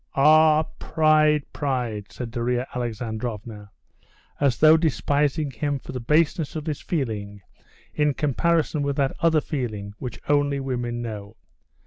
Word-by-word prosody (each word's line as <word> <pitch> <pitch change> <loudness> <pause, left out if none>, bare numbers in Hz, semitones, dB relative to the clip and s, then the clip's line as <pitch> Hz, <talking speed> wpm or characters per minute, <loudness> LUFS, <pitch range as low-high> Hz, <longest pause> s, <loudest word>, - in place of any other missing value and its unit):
"Ah, 155 +2 +6 0.2
pride, 155 -1 +3
pride!" 120 -8 -3
said 120 -2 -6
Darya 120 +1 -1
Alexandrovna, 110 -3 -5 0.7
as 140 -4 +2
though 155 +1 +7
despising 150 -2 +1
him 145 +1 -2
for - - -10
the 130 - -4
baseness 150 +4 +1
of 155 -1 -4
this 155 -3 -3
feeling 105 - -3 0.5
in 150 -2 +1
comparison 155 +2 +1
with 140 -1 -1
that 135 -1 0
other 165 -2 +3
feeling 110 -10 -4
which 125 -4 -6
only 145 -1 +2
women 120 -3 -3
know. 105 -2 -7
135 Hz, 130 wpm, -24 LUFS, 120-150 Hz, 0.7 s, though